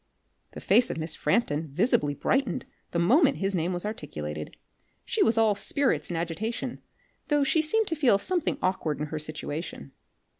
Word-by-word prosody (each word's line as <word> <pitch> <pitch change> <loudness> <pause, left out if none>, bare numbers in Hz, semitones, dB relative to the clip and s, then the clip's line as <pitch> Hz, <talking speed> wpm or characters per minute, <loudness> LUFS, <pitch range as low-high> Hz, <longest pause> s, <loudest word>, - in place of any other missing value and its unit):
The - - -7
face 245 - +4
of - - -4
Miss 160 0 -2
Frampton 160 -9 0
visibly 145 - +1
brightened 260 - 0 0.2
the - - -3
moment 270 - +4
his 195 0 0
name 175 0 0
was 175 +2 -2
articulated. 75 - -6 0.5
She - - -1
was 225 0 +3
all 220 -2 +4
spirits 255 +7 0
and 175 - -2
agitation, 175 +8 -3 0.5
though 295 -1 +2
she 310 +3 +3
seemed 440 +8 +3
to 325 - -1
feel 265 -9 +4
something 350 - 0
aukward 175 -5 -1
in 150 - -1
her 155 - -2
situation. 155 - -6
195 Hz, 165 wpm, -27 LUFS, 155-255 Hz, 0.5 s, face